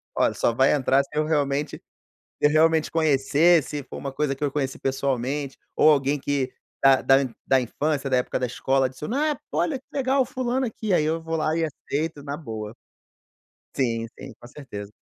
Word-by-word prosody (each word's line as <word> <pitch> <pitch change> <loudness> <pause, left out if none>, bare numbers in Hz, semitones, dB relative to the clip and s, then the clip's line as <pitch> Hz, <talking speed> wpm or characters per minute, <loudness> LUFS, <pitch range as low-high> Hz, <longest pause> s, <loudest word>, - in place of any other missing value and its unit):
olha, - - +2
só 115 - +1
vai 130 +4 +4
entrar 135 -1 +3
se - - -17
eu 155 0 +1
realmente 145 -1 -1 0.6
se - - +8
eu - - +1
realmente 160 +1 +3
conhecer, 160 +2 +3
se 145 -1 -5
for - - -9
uma 140 - -5
coisa 140 0 -1
que 150 - -6
eu 140 - 0
conheci 135 -2 -2
pessoalmente, 135 +1 -2 0.2
ou 155 - +6
alguém 140 0 +2
que 140 -2 -1 0.3
da 135 -1 +6
da 135 - +6 0.3
da 135 -1 +3
infância, 140 +3 -2
da 130 - +3
época 125 - -1
da 125 - 0
escola: 135 +2 +1
"Adiciona, 255 - -2
ah" 290 - -5
Pô, - - -1
olha 285 -4 0
que - - -35
legal, 270 -1 +2
fulano 255 +1 -1
aqui, 220 -2 -4
aí 155 - +3
eu 160 +1 -1
vou 165 0 -3
lá 155 +1 0
e 165 - 0
aceito 150 0 -3
na 145 0 -4
boa. 110 -7 -7 1.0
Sim, 115 -3 0
sim, 135 -3 -9
com 120 - -12
certeza. 105 -8 -9
145 Hz, 200 wpm, -24 LUFS, 135-160 Hz, 1.0 s, se